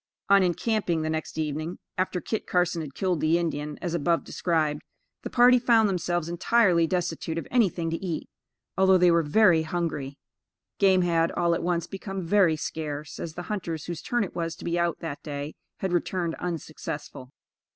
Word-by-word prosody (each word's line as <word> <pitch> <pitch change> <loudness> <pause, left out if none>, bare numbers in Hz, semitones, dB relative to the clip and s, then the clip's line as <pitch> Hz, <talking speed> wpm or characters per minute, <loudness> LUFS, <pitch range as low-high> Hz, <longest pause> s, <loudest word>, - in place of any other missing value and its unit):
On 200 0 +7
encamping 180 -2 0
the 155 - -1
next 160 0 -4
evening, 155 +2 -3 0.2
after 185 -1 -1
Kit 220 +4 -4
Carson 180 -2 +1
had 140 -3 -8
killed 185 -4 0
the 160 +2 +3
Indian, 150 -3 -3
as 175 -2 -2
above 170 +1 +1
described, 155 -4 -1 0.4
the - - -5
party 250 +1 +6
found 230 -3 +4
themselves 175 -3 -1
entirely 175 -1 +3
destitute 170 -2 -2
of 165 - -4
anything 185 -9 +1
to 165 - -4
eat, 170 -4 -3 0.5
although 190 0 +5
they 180 -1 +5
were 170 0 +4
very 165 +2 +4
hungry. 160 -4 -3 0.6
Game 190 -2 +5
had, 165 -1 +2
all 170 -1 +2
at - - -1
once, 170 -1 0
become 195 -1 -6
very 180 -2 +4
scarce, 150 -1 -5
as 165 -1 -6
the 175 - -5
hunters 170 -6 -4
whose 170 -2 -5
turn 240 -2 0
it 190 - -7
was 165 -1 -2
to - - -11
be 170 0 0
out 170 -1 0
that 145 -4 -5
day, 145 0 -5 0.3
had 190 -2 -1
returned 175 -1 -1
unsuccessful. 155 -6 -6
170 Hz, 180 wpm, -26 LUFS, 160-185 Hz, 0.6 s, On